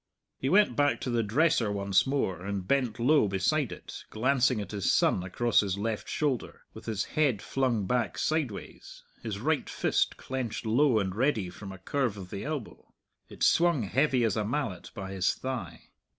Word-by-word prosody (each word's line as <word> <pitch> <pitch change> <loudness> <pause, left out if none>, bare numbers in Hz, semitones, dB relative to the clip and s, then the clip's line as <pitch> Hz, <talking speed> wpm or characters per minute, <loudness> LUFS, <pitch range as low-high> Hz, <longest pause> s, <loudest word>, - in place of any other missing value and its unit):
He 130 - -1
went 200 - +4
back 145 +2 +2
to 125 - -2
the 120 -1 +2
dresser 115 0 +2
once 100 +2 +2
more 95 - -1
and 100 -1 -4
bent 130 -5 +1
low 130 0 +4
beside 105 +9 0
it, - - -9
glancing 130 +1 +2
at 100 - -6
his 100 -3 0
son - - +3
across 115 +6 +1
his 100 -2 0
left 110 +1 -3
shoulder, 140 -5 -2
with - - -11
his 110 -3 -1
head 140 -9 +1
flung 120 -4 0
back 125 +2 0
sideways, 150 -10 -3 0.2
his - - -4
right - - 0
fist - - 0
clenched 130 -4 -4
low 120 +2 +3
and 95 -3 0
ready 110 -7 0
from 95 +1 -9
a 95 - -9
curve 120 +3 -1
of 90 -2 -9
the 100 - -5
elbow. 150 -6 -6 0.4
It - - -6
swung 170 -7 +4
heavy 130 +4 +2
as 110 -4 +1
a 110 - 0
mallet 110 - -3
by 95 -1 -6
his 95 -2 +1
thigh. 115 -11 -6
115 Hz, 180 wpm, -29 LUFS, 100-135 Hz, 0.4 s, went